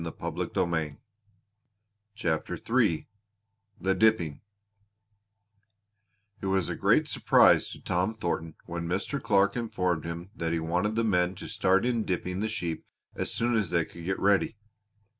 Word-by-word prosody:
CHAPTER 85 Hz, -8 st, -1 dB
III 80 Hz, -, +1 dB, 0.7 s
THE 95 Hz, 0 st, +1 dB
DIPPING 95 Hz, -7 st, +2 dB, 2.0 s
It -, -, -4 dB
was 95 Hz, -3 st, +1 dB
a -, -, -2 dB
great -, -, +3 dB
surprise -, -, +5 dB
to -, -, -9 dB
Tom 90 Hz, +5 st, -1 dB
Thornton 85 Hz, -5 st, -3 dB
when 85 Hz, 0 st, -4 dB
Mr. 100 Hz, -, -2 dB
Clark 100 Hz, -2 st, +3 dB
informed 90 Hz, -9 st, -1 dB
him 85 Hz, +3 st, -6 dB
that 85 Hz, -1 st, -2 dB
he 85 Hz, -, +1 dB
wanted 90 Hz, +6 st, 0 dB
the 115 Hz, -, +2 dB
men 90 Hz, -4 st, +2 dB
to -, -, -8 dB
start 95 Hz, +3 st, +2 dB
in 120 Hz, -3 st, +1 dB
dipping 90 Hz, 0 st, -2 dB
the 110 Hz, +2 st, -1 dB
sheep 85 Hz, -7 st, -3 dB, 0.3 s
as -, -, -3 dB
soon 120 Hz, 0 st, 0 dB
as 105 Hz, -5 st, +1 dB
they 85 Hz, -2 st, +1 dB
could 85 Hz, -, -12 dB
get 95 Hz, +1 st, -1 dB
ready. 100 Hz, +2 st, +2 dB
95 Hz, 140 wpm, -28 LUFS, 85-105 Hz, 2.0 s, surprise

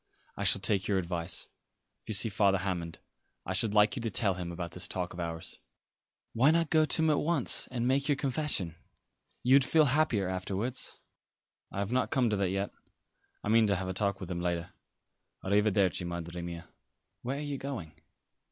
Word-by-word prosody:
I -, -, -4 dB
shall -, -, +4 dB
take 100 Hz, 0 st, +1 dB
your 100 Hz, -, +1 dB
advice. 85 Hz, -1 st, -1 dB, 0.5 s
If -, -, -19 dB
you -, -, -1 dB
see 110 Hz, +4 st, +4 dB
Father 100 Hz, -2 st, +2 dB
Hammond 90 Hz, -3 st, -3 dB, 0.5 s
I 95 Hz, -, -3 dB
should 105 Hz, +2 st, 0 dB
like 105 Hz, +2 st, +4 dB
you 125 Hz, -, -4 dB
to 115 Hz, -, -2 dB
tell 100 Hz, -1 st, +2 dB
him 90 Hz, -1 st, -5 dB
about 85 Hz, 0 st, -5 dB
this 90 Hz, +2 st, -1 dB
talk 90 Hz, -1 st, -4 dB
of 90 Hz, -, -9 dB
ours." 85 Hz, -1 st, -6 dB, 0.7 s
"Why 130 Hz, +5 st, +4 dB
not 165 Hz, 0 st, +2 dB
go 155 Hz, -1 st, +5 dB
to 160 Hz, -, +4 dB
him 160 Hz, -, +3 dB
at 150 Hz, -, +2 dB
once 160 Hz, -5 st, +4 dB
and 120 Hz, -1 st, -2 dB
make 140 Hz, +3 st, +1 dB
your 145 Hz, -, +4 dB
confession? 135 Hz, -, 0 dB, 0.7 s
You 125 Hz, -, +4 dB
would 140 Hz, 0 st, +7 dB
feel 155 Hz, +3 st, +4 dB
happier 130 Hz, -8 st, +1 dB
afterwards." 95 Hz, +7 st, -3 dB, 0.7 s
"I -, -, -8 dB
have 100 Hz, +2 st, -2 dB
not 130 Hz, +1 st, +1 dB
come 125 Hz, -4 st, +1 dB
to -, -, +1 dB
that 100 Hz, -2 st, 0 dB
yet. 100 Hz, +2 st, -2 dB, 0.7 s
I -, -, -3 dB
mean 115 Hz, 0 st, +5 dB
to 100 Hz, -, +2 dB
have 95 Hz, 0 st, -3 dB
a -, -, -2 dB
talk 100 Hz, 0 st, 0 dB
with 95 Hz, -1 st, -7 dB
him 85 Hz, -1 st, -3 dB
later. 85 Hz, 0 st, -2 dB, 0.7 s
A 95 Hz, -, -4 dB
riverdervi, 100 Hz, -3 st, +2 dB
Madre 85 Hz, 0 st, -5 dB
mia." 85 Hz, -1 st, -7 dB, 0.5 s
"Where 130 Hz, +3 st, -3 dB
are -, -, -4 dB
you 145 Hz, -2 st, -4 dB
going?" 130 Hz, -, -6 dB
100 Hz, 200 wpm, -30 LUFS, 90-130 Hz, 0.7 s, would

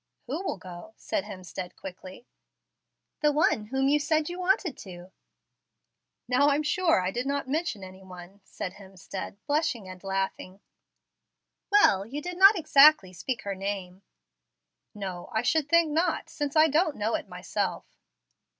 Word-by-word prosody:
"Who 285 Hz, +8 st, -3 dB
will 300 Hz, -, -3 dB
go?" 185 Hz, +4 st, -11 dB
said 190 Hz, -, -3 dB
Hemstead, 185 Hz, -3 st, -8 dB
quickly. 190 Hz, +4 st, -10 dB, 0.9 s
"The 300 Hz, -1 st, +3 dB
one 290 Hz, -7 st, +2 dB
whom 265 Hz, +4 st, 0 dB
you 295 Hz, +2 st, +3 dB
said 310 Hz, +1 st, 0 dB
you 350 Hz, +1 st, -6 dB
wanted 365 Hz, -4 st, +1 dB
to." 180 Hz, -1 st, -11 dB, 1.2 s
"Now 265 Hz, +4 st, +4 dB
I'm 290 Hz, +2 st, +1 dB
sure 330 Hz, -, +2 dB
I 185 Hz, +1 st, -1 dB
did 245 Hz, +5 st, -3 dB
not 280 Hz, -1 st, -2 dB
mention 290 Hz, -, -2 dB
any 190 Hz, 0 st, -11 dB
one," 185 Hz, +1 st, -12 dB
said 185 Hz, -1 st, -6 dB
Hemstead, 190 Hz, 0 st, -8 dB
blushing 285 Hz, -, -1 dB
and 185 Hz, 0 st, -11 dB
laughing. 195 Hz, 0 st, -3 dB, 1.1 s
"Well, 300 Hz, -, +5 dB
you 280 Hz, +5 st, -5 dB
did 355 Hz, +3 st, -6 dB
not 390 Hz, +2 st, +8 dB
exactly 290 Hz, -, +6 dB
speak 215 Hz, +5 st, -4 dB
her 200 Hz, -, -3 dB
name." 190 Hz, -1 st, -5 dB, 0.9 s
"No, 190 Hz, -4 st, -6 dB
I 220 Hz, -, 0 dB
should 295 Hz, +3 st, +1 dB
think 335 Hz, -2 st, +4 dB
not, 330 Hz, +2 st, 0 dB
since 290 Hz, -1 st, -3 dB
I 310 Hz, 0 st, +6 dB
don't 310 Hz, +1 st, +1 dB
know 215 Hz, +2 st, -1 dB
it -, -, -2 dB
myself." -, -, -4 dB
240 Hz, 150 wpm, -27 LUFS, 190-305 Hz, 1.2 s, not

